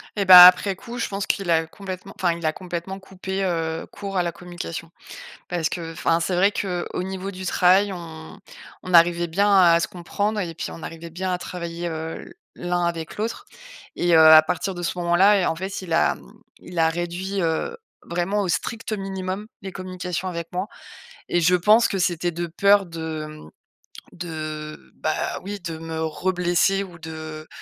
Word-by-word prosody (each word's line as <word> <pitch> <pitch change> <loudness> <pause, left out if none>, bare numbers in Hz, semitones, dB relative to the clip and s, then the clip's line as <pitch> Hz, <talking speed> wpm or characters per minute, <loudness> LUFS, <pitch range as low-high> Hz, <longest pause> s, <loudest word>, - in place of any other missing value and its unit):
Et 200 -2 0
bah, 180 -1 +12
après 185 +2 +5
coup, 235 +5 -8
je - - -1
pense 195 0 -3
qu'il 195 -3 -1
a 160 -1 +3
complètement, 185 +3 -8
enfin 175 -2 +2
il 170 - -7
a 155 - +1
complètement 180 +2 -6
coupé, 190 0 -5
heu, 165 -3 -2
court 200 -1 -7
à 180 - +3
la 175 -1 -1
communication. 170 -1 -7 0.6
Parce 170 -3 -1
qu'enfin 165 -1 -1
c'est 175 +2 -1
vrai 195 +3 +4
qu'au 180 -3 -3
niveau 190 +1 -5
du 185 0 -8
travail, 190 +3 +4
on 160 -3 -9 0.5
on 185 - -4
arrivait 170 0 +5
bien 200 +5 +2
à 175 -3 +6
se - - -1
comprendre 200 +4 -3
et 170 -5 -3
puis - - -5
on 165 - -9
arrivait 165 0 -8
bien 185 +3 -3
à 180 - -1
travailler, 170 -1 -5
heu, 160 0 -5
l - - -13 0.2
l'un 175 0 -1
avec 165 -2 -3
l'autre, 220 +2 -3 0.5
et 175 -1 +2
heu, 160 - +7
à 155 0 +9
partir 180 +3 -2
de 175 - -5
ce 170 - -2
moment-là, 185 +3 +4
heu. - - +1
En 165 - 0
fait, 190 +2 -5
il 170 -3 -6
a, - - +3
mmh, - - -17 0.2
il 175 - -8
a 160 0 +4
réduit, 175 +4 -3
heu, 165 - -1 0.3
vraiment 180 +4 -1
au 185 - -2
strict 220 +8 -3
minimum 195 0 -4 0.2
les 190 - -6
communications 185 -1 -4
avec 170 -2 -5
moi 185 +4 -3 0.6
et 175 - +2
je 170 +2 +4
pense 210 +6 +5
que - - -2
c'était 175 -1 0
de 170 +1 -4
peur 200 +3 +4
de, 160 -2 -5
mmh 155 - -12 0.6
de 155 -3 -7
bah, 155 - -2
oui 200 0 -6
de 165 -2 -5
me 160 0 -4
reblesser 180 +3 +1
ou 175 -3 -12
de 155 -1 -8
175 Hz, 190 wpm, -23 LUFS, 165-190 Hz, 0.6 s, bah